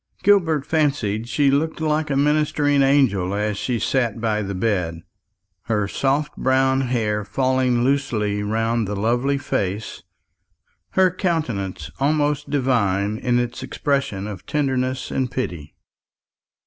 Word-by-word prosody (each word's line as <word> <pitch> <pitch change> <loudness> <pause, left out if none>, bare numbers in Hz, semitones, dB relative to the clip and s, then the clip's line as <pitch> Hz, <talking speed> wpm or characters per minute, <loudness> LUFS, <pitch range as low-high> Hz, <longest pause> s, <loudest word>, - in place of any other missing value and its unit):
Gilbert 165 -8 +3
fancied 130 -9 0
she 135 +5 +3
looked 155 +4 0
like 155 -1 0
a 140 - 0
ministering 145 0 +2
angel 120 -9 +2
as 105 0 -1
she 120 +4 -2
sat 120 -2 0
by 110 -2 0
the 100 -1 -4
bed, 90 -5 -1 0.6
her 105 -3 0
soft 140 +7 -1
brown 130 0 +2
hair 110 -5 -1
falling 130 +2 +1
loosely 120 -7 0
round 115 +1 0
the 105 - -3
lovely 120 +7 +1
face, 105 -6 -3 0.9
her 185 -1 +4
countenance 110 - -2
almost 145 +1 +1
divine 110 -7 +1
in 125 -1 +1
its 120 +1 -2
expression 135 -6 -2
of 105 -2 -7
tenderness 130 -3 -1
and 130 -2 -1
pity. 85 - -5
125 Hz, 125 wpm, -22 LUFS, 105-140 Hz, 0.9 s, her